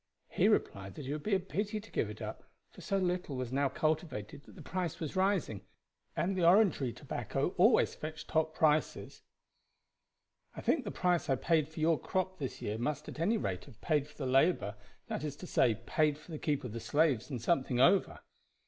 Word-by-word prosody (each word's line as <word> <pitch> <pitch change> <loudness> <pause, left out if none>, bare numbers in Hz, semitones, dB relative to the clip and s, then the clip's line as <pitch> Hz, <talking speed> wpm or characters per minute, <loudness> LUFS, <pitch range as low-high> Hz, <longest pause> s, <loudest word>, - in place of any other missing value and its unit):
He - - +2
replied 95 0 0
that 150 - -7
it 140 - -3
would 150 - -4
be 210 +3 +1
a - - +2
pity 205 +3 -3
to 220 - -14
give - - 0
it - - -7
up, - - -6 0.3
for - - -13
so 195 - 0
little 180 -5 -1
was 125 -2 -4
now 140 0 +2
cultivated 155 - -2
that - - -15
the - - -11
price 180 -4 -3
was 160 0 -4
rising, 185 - +1 0.5
and 195 +2 0
the 180 - 0
Orangery 170 - +4
tobacco - - -3
always - - +4
fetched 155 0 -7
top 160 0 0
prices. 155 -1 +1 1.3
'I - - -6
think 305 - +1
the - - -2
price 180 -5 0
I 135 - +4
paid 155 +2 +2
for 160 - -9
your 160 0 +3
crop 185 -1 -2
this 135 -3 -5
year 105 +2 -2
must 150 +5 -2
at - - -9
any 205 +8 +2
rate 95 - -3
have 135 -7 -16
paid 150 -3 +1
for 150 - -19
the 140 - -3
labor 135 - +3 0.3
that - - -4
is 150 -2 -3
to 180 - -9
say, 120 -9 +3
paid 150 -2 +2
for 155 +3 -14
the 155 - -5
keep 145 -3 -1
of 125 -4 -6
the 115 - -4
slaves 130 0 +1
and 130 -4 -3
something 130 -1 +1
over.' 185 +8 +4
155 Hz, 210 wpm, -32 LUFS, 135-180 Hz, 1.3 s, Orangery